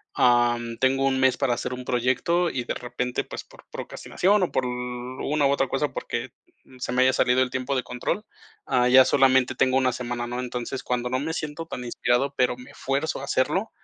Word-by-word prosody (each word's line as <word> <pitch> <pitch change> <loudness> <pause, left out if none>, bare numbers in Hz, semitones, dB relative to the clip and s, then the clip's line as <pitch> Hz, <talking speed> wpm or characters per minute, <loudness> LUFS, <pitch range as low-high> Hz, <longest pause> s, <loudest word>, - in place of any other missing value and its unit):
ah, 120 -1 +4 0.2
tengo 135 +2 +2
1 130 -1 +1
mes 130 -1 +4
para 125 - +1
hacer 125 - -3
un 125 0 -6
proyecto 130 +9 +1
y, 130 - -3
de - - -3
repente, 125 0 -3
pues, - - -7
por - - -19
procrastinación 200 +3 0
o 180 - 0
por 130 - +1
una 125 +4 -2
u 140 - +4
otra 135 -1 +1
cosa, - - -1
porque - - -4 0.5
se 125 - -3
me 125 - +3
haya 130 0 +5
salido 130 0 +3
el 130 - +1
tiempo 130 +1 -2
de 130 - 0
control, 125 - -3 0.4
ah, 125 0 +3
ya 130 +1 +8
solamente 130 -1 +3
tengo 130 +1 +2
1 130 -1 +3
semana, 120 -1 -4
¿no? 120 +1 -4
Entonces, 125 +1 -4
cuando 125 0 -2
no 130 +1 0
me 160 +4 -3
siento 155 +1 -4
tan 125 - -6
inspirado, 125 +3 0
pero 125 -1 +2
me 125 0 -13
fuerzo 140 +4 -2
a 135 - -6
hacerlo, 155 +11 0
130 Hz, 210 wpm, -25 LUFS, 125-135 Hz, 0.5 s, ya